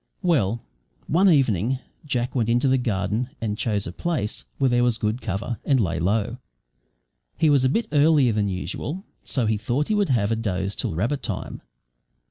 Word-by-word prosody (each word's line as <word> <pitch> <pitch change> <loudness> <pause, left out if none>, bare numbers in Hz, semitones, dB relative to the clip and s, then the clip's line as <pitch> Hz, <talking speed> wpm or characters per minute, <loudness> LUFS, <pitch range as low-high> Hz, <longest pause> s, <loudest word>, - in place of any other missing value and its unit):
Well, 120 - +1 0.4
one 185 +5 +4
evening 130 - +2 0.3
Jack 125 -2 -1
went 115 -4 0
into 120 +3 +3
the 130 0 +3
garden 110 +1 -1
and 110 -3 -2
chose 105 -2 -1
a 85 - -5
place 105 - -3
where 135 -2 +2
there 120 0 +3
was 120 -2 +2
good 110 +3 -1
cover, 110 +3 -3
and 135 -3 +3
lay 85 -6 0
low. 105 +7 0 1.0
He 155 -2 +4
was 140 -3 +4
a 130 - +4
bit 225 - 0
earlier 145 -4 +4
than 105 -1 +1
usual, 120 - -4 0.2
so 125 -4 -1
he 110 0 +1
thought 120 +8 -1
he - - +2
would 205 -4 +2
have 115 -5 +2
a - - +2
doze 100 -3 -2
till - - -2
rabbit 115 - -1
time. - - -5
120 Hz, 185 wpm, -24 LUFS, 105-140 Hz, 1.0 s, one